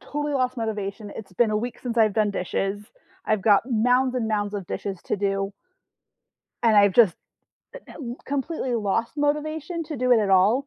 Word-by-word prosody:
totally 295 Hz, 0 st, -3 dB
lost 255 Hz, -1 st, 0 dB
motivation, 210 Hz, -2 st, -4 dB
it's 200 Hz, -3 st, -9 dB
been 225 Hz, +4 st, +2 dB
a 210 Hz, -, +1 dB
week 240 Hz, +3 st, -4 dB
since 240 Hz, -2 st, -4 dB
I've 215 Hz, -2 st, +4 dB
done 215 Hz, -2 st, +2 dB
dishes, 195 Hz, +2 st, -2 dB, 0.4 s
I've 215 Hz, -3 st, 0 dB
got 205 Hz, -3 st, +5 dB
mounds 250 Hz, +2 st, +2 dB
and 230 Hz, -3 st, -1 dB
mounds 205 Hz, -1 st, -1 dB
of 195 Hz, -4 st, -4 dB
dishes 195 Hz, -3 st, -4 dB
to -, -, -1 dB
do 195 Hz, 0 st, -1 dB, 1.1 s
and 225 Hz, -2 st, +4 dB
I've 200 Hz, -1 st, +6 dB
just 210 Hz, -7 st, +5 dB, 0.6 s
eh, -, -, -6 dB
uh, -, -, -10 dB, 0.3 s
completely 275 Hz, -2 st, -2 dB
lost 225 Hz, +1 st, 0 dB
motivation 305 Hz, +3 st, -1 dB
to 305 Hz, -2 st, -6 dB
do 250 Hz, 0 st, +2 dB
it 230 Hz, -, +5 dB
at 200 Hz, -2 st, 0 dB
all. 210 Hz, +9 st, +4 dB
225 Hz, 185 wpm, -24 LUFS, 205-255 Hz, 1.1 s, I've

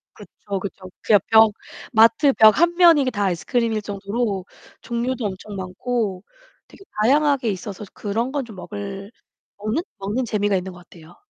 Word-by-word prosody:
그쵸, 200 Hz, -2 st, -7 dB
그쵸. 190 Hz, -1 st, -8 dB
그야 210 Hz, -2 st, +4 dB
벽 220 Hz, -1 st, +6 dB, 0.4 s
마트 230 Hz, +6 st, +5 dB
벽 215 Hz, -1 st, +6 dB
한 345 Hz, 0 st, +3 dB
면이 335 Hz, -6 st, +6 dB
다 205 Hz, -2 st, -1 dB
아이스크림일 215 Hz, +6 st, -1 dB
정도로 200 Hz, 0 st, -3 dB, 0.4 s
종류도 240 Hz, 0 st, -3 dB
엄청 200 Hz, +1 st, -6 dB
많고 195 Hz, +1 st, -3 dB, 0.4 s
되게 390 Hz, -, -17 dB, 0.2 s
다양하게 280 Hz, -1 st, +3 dB
있어서 200 Hz, +1 st, -5 dB
그런 225 Hz, +5 st, -3 dB
건 285 Hz, -3 st, -2 dB
좀 220 Hz, -4 st, -12 dB
먹을 200 Hz, +1 st, -7 dB, 0.5 s
먹는, 215 Hz, +10 st, -2 dB, 0.2 s
먹는 210 Hz, +6 st, -2 dB
재미가 205 Hz, -2 st, 0 dB
있는 185 Hz, 0 st, -3 dB
것 180 Hz, -, -13 dB
같아요. 170 Hz, -1 st, -17 dB
210 Hz, 310 characters per minute, -22 LUFS, 195-240 Hz, 0.5 s, 벽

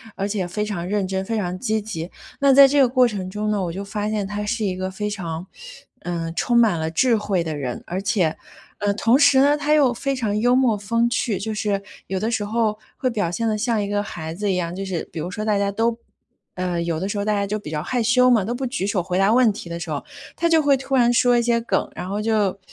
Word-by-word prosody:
而 195 Hz, -, -2 dB
且 200 Hz, -3 st, -2 dB
非 210 Hz, +4 st, -2 dB
常 180 Hz, -5 st, -4 dB
认 200 Hz, -1 st, 0 dB
真， 190 Hz, 0 st, -2 dB
非 225 Hz, +2 st, -2 dB
常 180 Hz, -2 st, -2 dB
积 220 Hz, -3 st, 0 dB
极。 180 Hz, -5 st, -6 dB, 0.3 s
那 280 Hz, -1 st, +5 dB
在 275 Hz, 0 st, +9 dB
这 285 Hz, +1 st, +2 dB
个 260 Hz, -, +6 dB
过 255 Hz, -1 st, +4 dB
程 195 Hz, -5 st, -4 dB
中 210 Hz, +2 st, -3 dB
呢， 210 Hz, -2 st, 0 dB
我 170 Hz, -, -2 dB
就 195 Hz, +3 st, -5 dB
发 205 Hz, +1 st, -3 dB
现 210 Hz, -2 st, -1 dB
他 210 Hz, 0 st, -4 dB
是 225 Hz, +1 st, -2 dB
一 185 Hz, -2 st, -1 dB
个 185 Hz, 0 st, -3 dB
非 210 Hz, +2 st, -3 dB
常， 175 Hz, -4 st, -5 dB, 0.6 s
呃， 170 Hz, -2 st, -3 dB
充 240 Hz, +7 st, +1 dB
满 220 Hz, -7 st, +4 dB
了 160 Hz, 0 st, -1 dB
智 240 Hz, +7 st, +3 dB
慧 200 Hz, -4 st, -1 dB
的 155 Hz, -2 st, -3 dB
人。 130 Hz, -4 st, -4 dB
而 185 Hz, +3 st, -3 dB
且 190 Hz, -5 st, 0 dB, 0.4 s
呃， 205 Hz, -1 st, +1 dB
同 230 Hz, +5 st, +3 dB
时 280 Hz, -2 st, +5 dB
呢， 285 Hz, +2 st, +5 dB
他 295 Hz, +1 st, +1 dB
又 275 Hz, -5 st, +4 dB
非 275 Hz, +3 st, -2 dB
常 215 Hz, -5 st, -1 dB
幽 245 Hz, +3 st, +3 dB
默 250 Hz, -4 st, +3 dB
风 230 Hz, +4 st, 0 dB
趣， 230 Hz, -4 st, -1 dB
就 220 Hz, +2 st, -3 dB
是 205 Hz, -2 st, -1 dB, 0.3 s
有 190 Hz, 0 st, -2 dB
的 220 Hz, +4 st, -1 dB
时 220 Hz, -3 st, -1 dB
候 215 Hz, 0 st, 0 dB, 0.2 s
会 255 Hz, -, 0 dB
表 205 Hz, -8 st, -1 dB
现 230 Hz, +5 st, -1 dB
得 215 Hz, -1 st, 0 dB
像 225 Hz, -1 st, 0 dB
一 200 Hz, -, -2 dB
个 205 Hz, 0 st, -1 dB
孩 160 Hz, -5 st, -6 dB
子 205 Hz, 0 st, -1 dB
一 180 Hz, -, 0 dB
样， 170 Hz, 0 st, -3 dB
就 195 Hz, -, -4 dB
是 180 Hz, -4 st, -3 dB
比 -, -, -10 dB
如 175 Hz, +4 st, -4 dB
说 215 Hz, +1 st, -4 dB
大 210 Hz, -2 st, +2 dB
家 200 Hz, 0 st, 0 dB
都 225 Hz, +2 st, 0 dB, 0.6 s
呃， 180 Hz, -2 st, -2 dB
有 165 Hz, -2 st, -2 dB
的 190 Hz, -, -2 dB
时 205 Hz, -, -3 dB
候 200 Hz, -, -1 dB
大 215 Hz, -, 0 dB
家 200 Hz, -1 st, 0 dB
就 210 Hz, +2 st, -2 dB
比 155 Hz, -7 st, -8 dB
较 150 Hz, -1 st, -2 dB
害 245 Hz, +7 st, -1 dB
羞 250 Hz, +2 st, +4 dB
嘛， 225 Hz, -5 st, +4 dB
都 230 Hz, -, -2 dB
不 260 Hz, +2 st, -3 dB
举 240 Hz, -6 st, -2 dB
手 200 Hz, -3 st, 0 dB
回 180 Hz, +1 st, -2 dB
答 195 Hz, +3 st, +4 dB
问 250 Hz, -1 st, +5 dB
题 180 Hz, -, -9 dB
的 170 Hz, 0 st, -5 dB
时 -, -, -6 dB
候， -, -, -3 dB, 0.3 s
他 335 Hz, -, +1 dB
就 325 Hz, -1 st, +4 dB
会 285 Hz, -2 st, +4 dB
突 270 Hz, +1 st, -6 dB
然 240 Hz, -1 st, +4 dB
说 245 Hz, 0 st, +4 dB
一 -, -, +3 dB
些 235 Hz, 0 st, +1 dB
梗， 235 Hz, -, -1 dB
然 180 Hz, -, -5 dB
后 205 Hz, +1 st, -2 dB
就， 210 Hz, -3 st, 0 dB
210 Hz, 295 characters per minute, -22 LUFS, 185-235 Hz, 0.6 s, 在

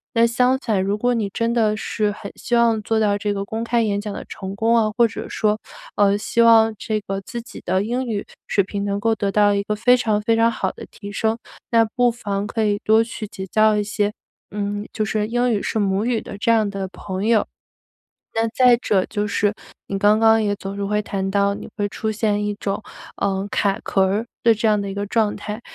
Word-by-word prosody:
但 230 Hz, 0 st, +5 dB
相 250 Hz, +3 st, +2 dB
反， 210 Hz, -8 st, 0 dB
如 200 Hz, +1 st, 0 dB
果 245 Hz, +3 st, +1 dB
你 220 Hz, -3 st, 0 dB
真 230 Hz, +1 st, 0 dB
的 215 Hz, -2 st, +2 dB
是 215 Hz, -1 st, -1 dB
很 200 Hz, 0 st, -8 dB
希 240 Hz, -, -6 dB
望 230 Hz, -2 st, +3 dB
做 220 Hz, +1 st, +1 dB
到 205 Hz, -1 st, +2 dB
这 205 Hz, 0 st, -1 dB
个 195 Hz, 0 st, -3 dB
公 220 Hz, +3 st, -4 dB
开 235 Hz, 0 st, +1 dB
演 205 Hz, -2 st, 0 dB
讲 205 Hz, -1 st, -5 dB
的 -, -, -6 dB
成 195 Hz, +1 st, -6 dB
功 225 Hz, +3 st, +2 dB
啊， 215 Hz, -2 st, +2 dB
或 235 Hz, -1 st, +5 dB
者 215 Hz, -, -7 dB
说， 215 Hz, 0 st, 0 dB, 0.4 s
呃， 200 Hz, -1 st, +4 dB
希 235 Hz, +2 st, +1 dB
望 225 Hz, -1 st, +6 dB
这 215 Hz, +1 st, -2 dB
个 195 Hz, -1 st, -4 dB
自 235 Hz, +4 st, -6 dB
己 240 Hz, -, -11 dB
的 185 Hz, +2 st, +1 dB
英 245 Hz, +5 st, -2 dB
语 210 Hz, -3 st, -3 dB, 0.2 s
水 200 Hz, -, +2 dB
平 200 Hz, +1 st, -4 dB
能 200 Hz, 0 st, -1 dB
够 225 Hz, +1 st, +1 dB
得 200 Hz, -2 st, -1 dB
到 205 Hz, 0 st, +4 dB
一 200 Hz, -, 0 dB
个 210 Hz, +1 st, -2 dB
非 245 Hz, +4 st, +4 dB
常 215 Hz, -3 st, 0 dB
非 225 Hz, +1 st, +2 dB
常 230 Hz, +1 st, +3 dB
好 -, -, -2 dB
地 -, -, -10 dB
提 200 Hz, -1 st, -9 dB
升， 220 Hz, +2 st, 0 dB, 0.3 s
那 230 Hz, -1 st, +5 dB
不 245 Hz, -1 st, +3 dB
妨 200 Hz, -3 st, -3 dB
可 220 Hz, +1 st, -1 dB
以 205 Hz, -1 st, +1 dB
多 220 Hz, +1 st, +5 dB
去 230 Hz, -1 st, -6 dB
结 190 Hz, -1 st, -7 dB
交 215 Hz, +2 st, +3 dB
一 210 Hz, -, +1 dB
些， 205 Hz, 0 st, -1 dB, 0.4 s
嗯， 205 Hz, 0 st, -3 dB
就 215 Hz, -, -1 dB
是 215 Hz, 0 st, -1 dB
英 245 Hz, +2 st, +1 dB
语 210 Hz, -3 st, 0 dB
是 220 Hz, -, -1 dB
母 200 Hz, +2 st, +1 dB
语 240 Hz, -2 st, 0 dB
的 200 Hz, -, -8 dB
这 230 Hz, +3 st, +1 dB
样 220 Hz, -2 st, +3 dB
的 195 Hz, -1 st, -4 dB
朋 190 Hz, +1 st, -5 dB
友。 225 Hz, -1 st, +3 dB, 0.9 s
那 225 Hz, 0 st, +2 dB
再 250 Hz, +1 st, +5 dB
者 200 Hz, -5 st, +1 dB
就 210 Hz, -1 st, -2 dB
是， 205 Hz, 0 st, +1 dB, 0.3 s
你 195 Hz, -, -3 dB
刚 210 Hz, +1 st, +5 dB
刚 225 Hz, 0 st, +5 dB
也 205 Hz, -1 st, 0 dB
总 195 Hz, 0 st, -7 dB
是 200 Hz, -, -3 dB
会 210 Hz, +1 st, 0 dB
谈 195 Hz, -1 st, -3 dB
到 200 Hz, 0 st, +2 dB
你 -, -, -9 dB
会 205 Hz, 0 st, 0 dB
出 220 Hz, +2 st, -3 dB
现 210 Hz, -1 st, 0 dB
一 205 Hz, 0 st, -2 dB
种， 200 Hz, +1 st, -3 dB, 0.4 s
呃， 195 Hz, 0 st, -1 dB
卡 200 Hz, -1 st, +1 dB
壳 195 Hz, -, +2 dB
儿， 205 Hz, +4 st, -1 dB, 0.2 s
的 230 Hz, -1 st, +5 dB
这 220 Hz, +1 st, 0 dB
样 210 Hz, -1 st, +3 dB
的 200 Hz, -, -4 dB
一 195 Hz, -, -5 dB
个 200 Hz, 0 st, -2 dB
状 215 Hz, 0 st, +1 dB
态。 210 Hz, +2 st, -6 dB
210 Hz, 255 characters per minute, -21 LUFS, 200-225 Hz, 0.9 s, 望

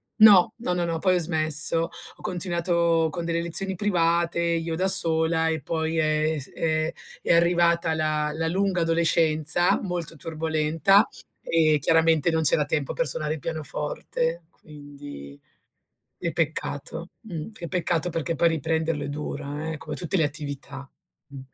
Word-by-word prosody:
no. 215 Hz, -2 st, +6 dB
No, 225 Hz, -7 st, -3 dB
no, 175 Hz, -1 st, -1 dB
no, 165 Hz, -1 st, -2 dB
poi 185 Hz, 0 st, +2 dB
ho -, -, +1 dB
smesso. 160 Hz, 0 st, +4 dB, 0.3 s
Ho -, -, -19 dB
continuato 170 Hz, -3 st, 0 dB
con 170 Hz, +2 st, -5 dB
delle 170 Hz, 0 st, -1 dB
lezioni 185 Hz, +3 st, 0 dB
private, 170 Hz, -3 st, 0 dB
io 165 Hz, -1 st, -1 dB
da 185 Hz, +3 st, 0 dB
sola 165 Hz, -3 st, +4 dB
e 160 Hz, -2 st, -2 dB
poi 160 Hz, +2 st, -3 dB
è 155 Hz, 0 st, +1 dB
è -, -, -4 dB
s 135 Hz, -, -8 dB
è 155 Hz, 0 st, -1 dB, 0.3 s
è -, -, +1 dB
arrivata 170 Hz, -1 st, +2 dB
la 155 Hz, -1 st, -1 dB
la 160 Hz, +1 st, -2 dB
lunga 185 Hz, +1 st, 0 dB
adolescenza 165 Hz, 0 st, +2 dB
molto 175 Hz, -4 st, -4 dB
turbolenta, 160 Hz, +4 st, +1 dB, 0.4 s
e 155 Hz, -2 st, +2 dB
chiaramente 165 Hz, 0 st, +2 dB
non 160 Hz, 0 st, 0 dB
c'era 150 Hz, 0 st, +3 dB
tempo 145 Hz, -2 st, -2 dB
per 165 Hz, -, -1 dB
suonare 150 Hz, +3 st, -1 dB
il 160 Hz, -, -6 dB
pianoforte, 160 Hz, +2 st, -3 dB
quindi 145 Hz, -, -12 dB, 0.8 s
che 170 Hz, -, -3 dB
peccato, 160 Hz, +1 st, -3 dB
mh. 175 Hz, -8 st, -7 dB
Che 180 Hz, -5 st, -8 dB
peccato 175 Hz, -2 st, -1 dB
perché 165 Hz, 0 st, -3 dB
poi 170 Hz, +3 st, +2 dB
riprenderlo 160 Hz, -1 st, -2 dB
è -, -, -5 dB
dura, 145 Hz, +1 st, -5 dB
eh, 155 Hz, -, -5 dB
come -, -, -7 dB
tutte 180 Hz, +2 st, -1 dB
le 160 Hz, -, +2 dB
attività. 145 Hz, -2 st, -6 dB, 0.4 s
Mh. 140 Hz, -1 st, -10 dB
165 Hz, 155 wpm, -24 LUFS, 155-170 Hz, 0.8 s, no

